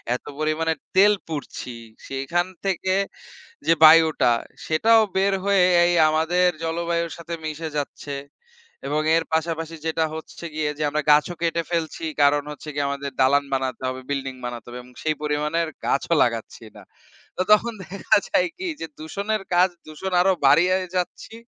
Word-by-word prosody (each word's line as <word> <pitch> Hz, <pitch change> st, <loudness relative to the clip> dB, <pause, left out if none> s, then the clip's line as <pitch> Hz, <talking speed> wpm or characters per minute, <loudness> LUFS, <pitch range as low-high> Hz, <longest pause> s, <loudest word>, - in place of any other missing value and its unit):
এত -, -, -8 dB
পরিমাণে 155 Hz, +1 st, 0 dB, 0.2 s
তেল 205 Hz, +2 st, +6 dB
পুড়ছি, 145 Hz, -5 st, -6 dB, 0.3 s
সেইখান 135 Hz, +7 st, -1 dB, 0.2 s
থেকে 190 Hz, 0 st, 0 dB, 0.7 s
যে, 165 Hz, -, +6 dB
বায়ুটা, 155 Hz, -6 st, +7 dB, 0.3 s
সেটাও 225 Hz, +8 st, +4 dB, 0.2 s
বের 195 Hz, +1 st, +2 dB
হয়ে 200 Hz, -2 st, +4 dB, 0.2 s
এই 175 Hz, -, +2 dB, 0.2 s
আমাদের 170 Hz, +3 st, +2 dB, 0.2 s
জলবায়ুর 170 Hz, 0 st, -1 dB
সাথে 170 Hz, 0 st, -7 dB
মিশে 155 Hz, +1 st, -4 dB
যাচ্ছে। 145 Hz, 0 st, -5 dB, 0.7 s
এবং 150 Hz, +1 st, 0 dB, 0.2 s
এর 165 Hz, -, 0 dB
পাশাপাশি 165 Hz, 0 st, -1 dB
যেটা 160 Hz, 0 st, +1 dB
হচ্ছে 160 Hz, +1 st, -9 dB
গিয়ে 155 Hz, -1 st, 0 dB
যে, -, -, 0 dB
আমরা 150 Hz, +1 st, -1 dB
গাছও 150 Hz, +4 st, +3 dB
কেটে 170 Hz, 0 st, 0 dB
ফেলছি। 165 Hz, -1 st, -2 dB, 0.2 s
কারণ 145 Hz, 0 st, +4 dB
হচ্ছে 150 Hz, +1 st, -9 dB
গিয়ে 145 Hz, -1 st, 0 dB
আমাদের 140 Hz, 0 st, -4 dB
দালান 140 Hz, +2 st, +4 dB
বানাতে 130 Hz, -2 st, -2 dB
হবে, 130 Hz, 0 st, -4 dB
বিল্ডিং 135 Hz, -2 st, -3 dB
বানাতে 120 Hz, -2 st, -6 dB
হবে 125 Hz, +1 st, -7 dB
এবং 125 Hz, -, -17 dB
সেই 155 Hz, -1 st, +1 dB
পরিমাণের 150 Hz, +3 st, 0 dB, 0.2 s
গাছও 165 Hz, +4 st, +1 dB
লাগাচ্ছি 115 Hz, -1 st, -4 dB
না। -, -, -12 dB, 0.5 s
তো -, -, 0 dB
তখন 230 Hz, +2 st, +2 dB
দেখা 195 Hz, +4 st, +1 dB
যায় 180 Hz, -, +2 dB
কি? 375 Hz, -1 st, -4 dB
যে, -, -, -2 dB
দূষণের 200 Hz, +6 st, -3 dB
কাজ 180 Hz, +1 st, +5 dB, 0.2 s
দূষণ 170 Hz, +5 st, -6 dB
আরো 190 Hz, +1 st, +4 dB
বাড়িয়েই 185 Hz, +5 st, +4 dB
যাচ্ছি 180 Hz, +5 st, -4 dB
160 Hz, 155 wpm, -23 LUFS, 145-175 Hz, 0.7 s, বায়ুটা